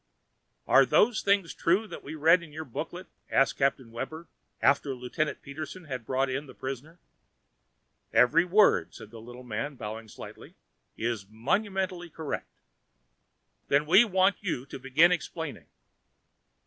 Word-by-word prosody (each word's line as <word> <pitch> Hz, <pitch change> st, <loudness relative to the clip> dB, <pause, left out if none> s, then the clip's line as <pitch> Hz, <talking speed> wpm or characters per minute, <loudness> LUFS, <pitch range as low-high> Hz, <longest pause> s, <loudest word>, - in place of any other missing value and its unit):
"Are -, -, +6 dB
those 225 Hz, +1 st, +3 dB
things 200 Hz, -4 st, +1 dB
true, 185 Hz, +7 st, +1 dB
that 175 Hz, -, -9 dB
we 150 Hz, -, -7 dB
read 165 Hz, +4 st, +5 dB
in 165 Hz, -3 st, -12 dB
your 155 Hz, +1 st, -7 dB
booklet?" 165 Hz, +8 st, -6 dB, 0.2 s
asked 135 Hz, -, +2 dB
Captain 135 Hz, -3 st, 0 dB
Webber 160 Hz, +8 st, -6 dB, 0.3 s
after 140 Hz, -1 st, +2 dB
Lieutenant 125 Hz, +5 st, -3 dB
Peterson 155 Hz, +5 st, -7 dB
had 130 Hz, -6 st, -6 dB
brought 135 Hz, +1 st, +1 dB
in 135 Hz, +3 st, -3 dB
the -, -, -13 dB
prisoner. 135 Hz, +5 st, -7 dB, 1.1 s
"Every 155 Hz, +7 st, +5 dB
word," 180 Hz, -, +3 dB
said 110 Hz, -, -11 dB
the 115 Hz, -1 st, -10 dB
little 120 Hz, +2 st, -11 dB
man 125 Hz, +5 st, -4 dB
bowing 110 Hz, -1 st, -7 dB
slightly, -, -, -11 dB, 0.4 s
"is 115 Hz, -4 st, -3 dB
monumentally 185 Hz, -, -2 dB
correct." 160 Hz, -2 st, -6 dB, 1.1 s
"Then 145 Hz, +2 st, +3 dB
we 190 Hz, +8 st, +7 dB
want 190 Hz, -2 st, +2 dB
you 165 Hz, -10 st, -3 dB
to 135 Hz, -, -9 dB
begin 135 Hz, +7 st, +4 dB
explaining." 165 Hz, -3 st, -4 dB
150 Hz, 140 wpm, -28 LUFS, 125-175 Hz, 1.1 s, we